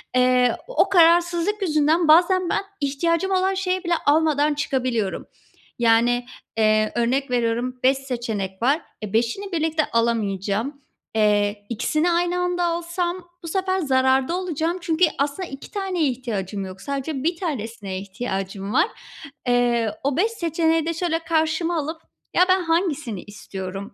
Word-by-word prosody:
Eee, 250 Hz, -1 st, +3 dB
o -, -, +2 dB
kararsızlık 345 Hz, +2 st, +4 dB
yüzünden 315 Hz, -1 st, +2 dB
bazen 350 Hz, +3 st, +5 dB
ben -, -, 0 dB, 0.2 s
ihtiyacım 335 Hz, +7 st, 0 dB
olan 380 Hz, +1 st, +2 dB
şeyi 375 Hz, -1 st, -1 dB
bile 345 Hz, -1 st, 0 dB
almadan 300 Hz, 0 st, +3 dB
çıkabiliyorum 255 Hz, -8 st, -1 dB, 0.5 s
yani, 240 Hz, +1 st, +3 dB, 0.3 s
eee, 215 Hz, -1 st, +3 dB
örnek 255 Hz, +3 st, 0 dB
veriyorum 245 Hz, +1 st, 0 dB
5 265 Hz, +1 st, +4 dB
seçenek 230 Hz, -8 st, -4 dB
var, 275 Hz, +7 st, +2 dB, 0.2 s
eee, 210 Hz, -1 st, -6 dB
5'ini 240 Hz, -, 0 dB
birlikte 320 Hz, -2 st, +1 dB
alamayacağım. 230 Hz, +3 st, 0 dB, 0.3 s
Eee, 205 Hz, -1 st, +2 dB
2'sini 305 Hz, +9 st, 0 dB
aynı 350 Hz, +1 st, +1 dB
anda 355 Hz, 0 st, 0 dB
alsam 345 Hz, +1 st, -2 dB
bu -, -, -6 dB
sefer 375 Hz, +2 st, 0 dB
zararda 265 Hz, 0 st, +2 dB
olacağım 340 Hz, -1 st, -2 dB
çünkü 335 Hz, +1 st, +3 dB
aslında 290 Hz, +6 st, -2 dB
2 275 Hz, -, -10 dB
taneye 380 Hz, -6 st, 0 dB
ihtiyacım 210 Hz, -6 st, -4 dB
yok. 190 Hz, 0 st, -10 dB
Sadece 275 Hz, +2 st, -3 dB
1 335 Hz, +3 st, +1 dB
tanesine 225 Hz, -, -4 dB
ihtiyacım 195 Hz, 0 st, -4 dB
var. 320 Hz, +8 st, +4 dB, 0.6 s
Eee, 240 Hz, -2 st, +2 dB
o 275 Hz, 0 st, 0 dB
5 430 Hz, +6 st, +2 dB
seçeneği 325 Hz, -5 st, 0 dB
de 335 Hz, -, -1 dB
şöyle 330 Hz, -1 st, -1 dB
karşıma 330 Hz, +1 st, 0 dB
alıp 320 Hz, +2 st, -4 dB, 0.3 s
"Ya, 360 Hz, -, +5 dB
ben 370 Hz, 0 st, +4 dB
hangisini 315 Hz, -, -1 dB
istiyorum, 195 Hz, -1 st, -7 dB
285 Hz, 140 wpm, -23 LUFS, 230-345 Hz, 0.6 s, bazen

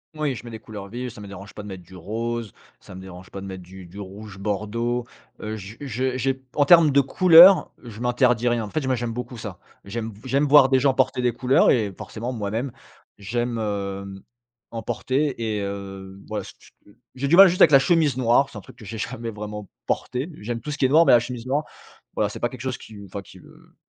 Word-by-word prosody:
Oui, 150 Hz, -4 st, -1 dB
je -, -, -9 dB
mets 120 Hz, -, -8 dB
des 110 Hz, -, -7 dB
couleurs 100 Hz, -3 st, -9 dB
vives, 125 Hz, +2 st, -5 dB
ça 110 Hz, -2 st, -12 dB
me 100 Hz, -, -9 dB
dérange 100 Hz, +1 st, -11 dB
pas 105 Hz, -, -7 dB
de -, -, -9 dB
mettre 95 Hz, -2 st, -8 dB
du 95 Hz, +2 st, -16 dB
rose, 115 Hz, +3 st, -4 dB, 0.3 s
ça -, -, -14 dB
me 95 Hz, -, -9 dB
dérange 95 Hz, -1 st, -12 dB
pas 100 Hz, -, -7 dB
de 100 Hz, -, -7 dB
mettre 95 Hz, -1 st, -8 dB
du 95 Hz, 0 st, -12 dB
du 100 Hz, +4 st, -11 dB
rouge 100 Hz, +1 st, -9 dB
bordeaux. 110 Hz, +4 st, -2 dB, 0.4 s
Heu, 110 Hz, 0 st, -4 dB
j 105 Hz, +1 st, -9 dB
je 130 Hz, -1 st, -2 dB
j'ai 135 Hz, +1 st, -1 dB, 0.2 s
en 145 Hz, -, +3 dB
termes 165 Hz, -2 st, +7 dB
de 140 Hz, +1 st, +5 dB
couleur, 180 Hz, +5 st, +7 dB
je 115 Hz, -2 st, -10 dB
m'interdis 125 Hz, -1 st, +2 dB
rien. 120 Hz, -2 st, +1 dB
En 105 Hz, -, -6 dB
fait 155 Hz, -, -2 dB
j -, -, -5 dB
moi, 130 Hz, -1 st, +1 dB
j'aime 120 Hz, -1 st, -3 dB
beaucoup 125 Hz, +1 st, -6 dB
ça. 100 Hz, -5 st, -7 dB, 0.3 s
J'aime 110 Hz, +1 st, -5 dB
j'aime 135 Hz, +3 st, +1 dB
voir 140 Hz, -2 st, +7 dB
des 130 Hz, -1 st, +4 dB
gens 135 Hz, 0 st, +3 dB
porter 130 Hz, -1 st, +1 dB
des 120 Hz, -2 st, +2 dB
couleurs 125 Hz, +2 st, +3 dB
et 105 Hz, -5 st, +1 dB
forcément 120 Hz, +3 st, -6 dB
moi-même 115 Hz, +3 st, -3 dB, 0.5 s
j'aime, 120 Hz, +4 st, -2 dB
hem, 100 Hz, -2 st, -4 dB, 0.5 s
en 115 Hz, -1 st, -6 dB
porter, 135 Hz, +1 st, -1 dB, 0.2 s
et -, -, -2 dB
heu, 95 Hz, -1 st, -7 dB
ouais, 105 Hz, -1 st, -2 dB
s -, -, -11 dB
s -, -, -18 dB, 0.2 s
heu 100 Hz, -, -20 dB, 0.2 s
j'ai 140 Hz, +2 st, -2 dB
du 170 Hz, -, +4 dB
mal 195 Hz, +1 st, +10 dB
juste 180 Hz, +2 st, 0 dB
avec 155 Hz, -, +8 dB
la 135 Hz, -, +8 dB
chemise 160 Hz, -2 st, +2 dB
noire, 130 Hz, +2 st, +3 dB
c'est 105 Hz, -, -10 dB
un -, -, -12 dB
truc -, -, -16 dB
que 110 Hz, -, -13 dB
j'ai 110 Hz, +2 st, -7 dB
jamais 115 Hz, 0 st, -4 dB
vraiment 105 Hz, -1 st, -7 dB, 0.2 s
porté. 130 Hz, +7 st, -2 dB
J'aime 115 Hz, +2 st, -4 dB
tout 150 Hz, -, -7 dB
ce 145 Hz, -, -3 dB
qui 135 Hz, -, +2 dB
est -, -, +3 dB
noir 165 Hz, +3 st, +5 dB
mais -, -, +7 dB
la 120 Hz, -, +7 dB
chemise 120 Hz, 0 st, -6 dB
noire, 145 Hz, +4 st, 0 dB, 0.5 s
voilà, -, -, 0 dB
c'est -, -, -8 dB
pas 120 Hz, -, 0 dB
quelque 125 Hz, -2 st, -10 dB
chose 130 Hz, -1 st, -3 dB
qui 110 Hz, -, -14 dB
m 100 Hz, -1 st, -10 dB
enfin, 100 Hz, +1 st, -7 dB
qui -, -, -15 dB
me -, -, -19 dB
115 Hz, 250 wpm, -23 LUFS, 100-130 Hz, 0.5 s, mal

